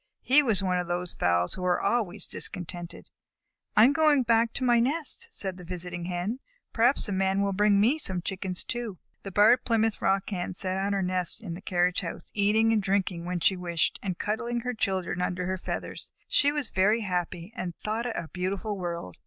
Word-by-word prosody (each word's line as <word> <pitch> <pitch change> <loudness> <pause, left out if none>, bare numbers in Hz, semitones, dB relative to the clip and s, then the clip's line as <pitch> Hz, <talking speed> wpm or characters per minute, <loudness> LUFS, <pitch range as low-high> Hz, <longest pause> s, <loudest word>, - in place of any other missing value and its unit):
He 270 +4 +6
was 220 -8 +2
one 180 -1 +1
of 180 - -3
those 175 0 -2
fowls 90 0 +1
who 185 - -6
are 180 -1 +2
always 210 -5 0
discontented. 175 -1 -7 0.7
"I 215 - +9
am 275 - +4
going 300 -3 +4
back 230 -1 +3
to 265 - -3
my 240 -2 +4
nest," 305 - 0
said 190 - -2
the 180 - -10
visiting 175 0 -4
Hen. 180 +7 -3 0.3
"Perhaps 240 +4 +3
the 205 - -2
Man 195 +1 +1
will 200 0 0
bring 205 +1 +4
me 245 +10 +3
some 185 - -1
Chickens 185 -2 -3
too." 235 -5 -5 0.2
The 195 - -7
Barred 210 +6 +5
Plymouth 225 -2 +1
Rock 195 +2 +1
Hen 180 -1 -3
sat 190 0 +1
on 200 +1 0
her 195 -1 0
nest 180 +1 -1
in 200 -7 -6
the 175 - -8
carriage 180 -2 +1
house, 170 - -6
eating 215 +2 +3
and 215 - +2
drinking 190 -3 -1
when 180 -1 -2
she 190 - +3
wished, 170 -2 -1
and 185 -4 -3
cuddling 235 +3 -2
her 250 +1 -3
children 190 -5 -1
under 180 0 -1
her 185 +1 -2
feathers. - - -5 0.2
She 285 - +3
was 295 -3 -2
very 210 +5 +3
happy, 180 0 -3
and 180 -7 -4
thought 225 +3 -3
it 230 - -4
a 170 - -4
beautiful 195 +3 -3
world. 170 - -5
195 Hz, 205 wpm, -27 LUFS, 180-225 Hz, 0.7 s, I